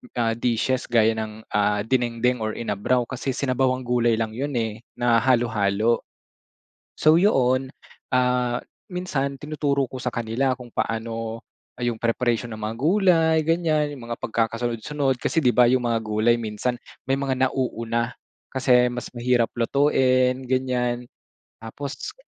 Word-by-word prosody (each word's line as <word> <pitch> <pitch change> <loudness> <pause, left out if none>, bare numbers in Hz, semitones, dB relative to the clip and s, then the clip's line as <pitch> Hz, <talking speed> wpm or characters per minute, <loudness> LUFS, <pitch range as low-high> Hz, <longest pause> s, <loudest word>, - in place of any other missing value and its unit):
ah, 115 -2 +1
dishes 125 +2 0
gaya 110 -1 +3
ng, 110 0 -5
ah, 105 0 +2
dinengdeng 125 0 +1
or 110 - -2
inabraw, 115 +3 0
kasi 130 +1 -3
sinabawang 130 -1 0
gulay 120 -1 +2
lang 110 -1 -1
yun 140 +4 -3
eh 110 -2 -1 0.2
na 120 -1 +3
halo-halo. 115 -3 +1 0.9
So, 155 +1 +5
'yon, 130 -8 +2 0.4
ah, 125 -1 +2 0.3
minsan 140 -7 -3
tinuturo 145 -3 -1
ko 130 - -7
sa 125 -1 -3
kanila 120 +3 0
kung 125 -2 -11
paano, 115 0 -3 0.4
ah, - - -3
yung 120 -2 0
preparation 115 0 0
ng 110 - -8
mga 110 - -5
gulay, 165 - +3
ganyan. 155 -2 +1
Yung 120 - -10
mga - - -7
pagkakasunod-sunod. 120 +4 -1
Kasi 160 - 0
'di 125 - +5
ba 125 - +6
yung 125 0 +2
mga 115 - +2
gulay 110 +2 +2
minsan 115 +2 -2 0.3
may 135 - +3
mga 135 -1 -1
nauuna, 115 -2 -2 0.4
kasi 125 -2 +4
mas 120 0 -6
mahirap 120 -1 +1
lutuin, 130 0 +2
ganyan. 125 -1 0 0.6
Tapos 140 - -6
125 Hz, 140 wpm, -24 LUFS, 115-135 Hz, 0.9 s, ba